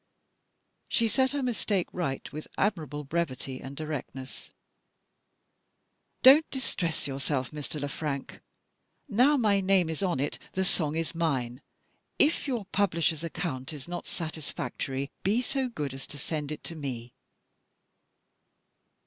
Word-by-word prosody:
She 230 - +3
set 260 +4 +3
her 285 0 -1
mistake 210 -6 +1
right 145 -8 -2
with 155 +1 -5
admirable 155 -7 0
brevity 135 -4 -2
and 135 +1 -7
directness. 140 -4 -5 1.7
"Don't 280 +5 +9
distress 180 - -1
yourself, 135 -1 -1
Mr. 150 0 -4
Le 145 - -1
Frank. 145 -1 -4 0.7
Now 260 +5 +5
my 210 -5 +4
name 185 -3 +4
is 160 - -4
on 180 -8 +1
it, 145 - -1
the 190 0 +1
Song 155 -4 +2
is 165 0 -1
mine. 135 -7 0 0.6
If 295 0 +4
your 240 -7 -1
publisher's 170 -5 +2
account 160 -4 -3
is 145 -1 -8
not 175 0 -4
satisfactory 145 -4 -3
be 210 +5 +3
so 260 +1 0
good 150 - -3
as 135 0 -7
to 145 - -7
send 150 +1 -3
it 155 - -5
to 165 - -6
_me." 125 -5 -5
160 Hz, 130 wpm, -29 LUFS, 140-200 Hz, 1.7 s, Don't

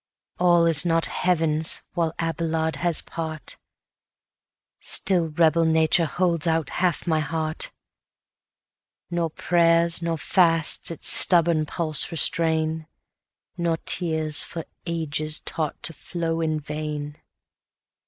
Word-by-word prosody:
All 175 -1 +4
is 165 -2 +4
not 165 -1 +1
Heaven's 160 -3 0
while 165 -2 -1
Abelard 165 -1 -2
has 175 -2 +2
part, 160 -2 -6 1.2
Still 180 -4 +2
rebel 165 +1 +2
nature 160 +1 +2
holds 175 -2 -1
out 160 -2 -1
half 180 -2 -1
my 160 -3 +1
heart; 155 0 -2 1.4
Nor 170 -1 -1
prayers 170 +1 +2
nor 165 -1 -2
fasts 165 -1 +2
its 165 - -4
stubborn 170 -3 +5
pulse 155 -3 0
restrain, 160 -1 0 0.7
Nor 170 -1 0
tears 160 -3 +2
for 165 -2 -4 0.2
ages 155 -2 -2
taught 155 -3 -4
to 165 - 0
flow 165 0 -4
in 155 -1 -1
vain. 150 0 -6
165 Hz, 110 wpm, -23 LUFS, 155-170 Hz, 1.4 s, stubborn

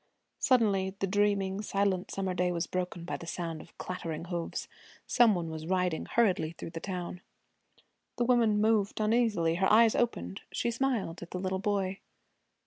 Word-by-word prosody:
Suddenly 200 -7 +2
the 195 - 0
dreaming, 200 0 +1
silent 195 -3 0
summer 190 -1 -2
day 180 0 +1
was 170 0 -1
broken 180 -2 -3
by - - -3
the 170 - -10
sound 165 -3 -4
of - - -17
clattering 165 -3 -5
hoofs. 170 -2 -4 0.4
Some 235 -4 +5
one 165 -2 -3
was 160 0 -6
riding 180 -2 0
hurriedly 185 -8 +2
through 165 - -8
the 165 - -5
town. 180 -1 -5 1.0
The 240 - +2
woman 230 -4 +3
moved 215 -2 +2
uneasily. 215 -7 +2
Her 190 - +4
eyes 225 +1 +6
opened. 95 - -1
She 235 - -1
smiled 230 -9 -1
at 175 - -8
the 180 - -4
little 190 0 -1
boy. 195 -1 -1
190 Hz, 165 wpm, -30 LUFS, 175-210 Hz, 1.0 s, eyes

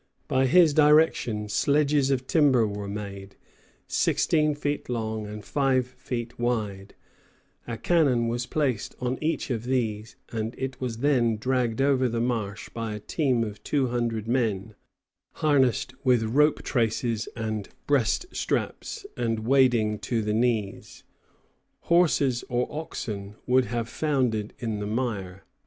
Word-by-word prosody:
By 130 0 +2
his 165 +2 +6
direction 150 -8 +3
sledges 145 +4 +2
of 130 -2 0
timber 135 -7 +4
were 100 -1 -4
made, 100 -1 -7 0.5
sixteen 150 -2 +2
feet 145 -1 -3
long 110 -3 -3
and 105 -1 -8
five 135 -3 +1
feet 120 -2 -6
wide; 105 -5 -2 0.7
a 115 -1 -4
cannon 135 -7 +2
was 120 +1 -2
placed 135 -8 -1
on 125 +1 -2
each 155 -3 -1
of 115 -1 -2
these, 115 -4 -2 0.2
and 110 0 -3
it 135 0 -5
was 120 -3 -3
then 120 -6 +3
dragged 125 +1 0
over 130 -2 +3
the 115 0 -2
marsh 115 -4 -2
by 115 -2 -4
a - - -6
team 130 0 0
of 105 -2 -7
two 135 -4 0
hundred 115 -3 -2
men, 110 -4 0 0.6
harnessed 135 -4 +2
with 125 -3 +3
rope 145 +7 +2
traces 115 -2 0
and 110 -3 -3 0.2
breast 140 - +2
straps, 455 -3 -3
and 115 -2 -1
wading 120 -5 +3
to 115 -3 -1
the 105 0 -1
knees. 110 -3 -1 0.8
Horses 150 -8 +2
or 125 0 0
oxen 105 -10 -5
would 130 0 +3
have 120 -2 -3
foundered 125 -8 -1
in 110 -4 -3
the 105 - -3
mire. 105 -5 -3
120 Hz, 140 wpm, -26 LUFS, 110-135 Hz, 0.8 s, his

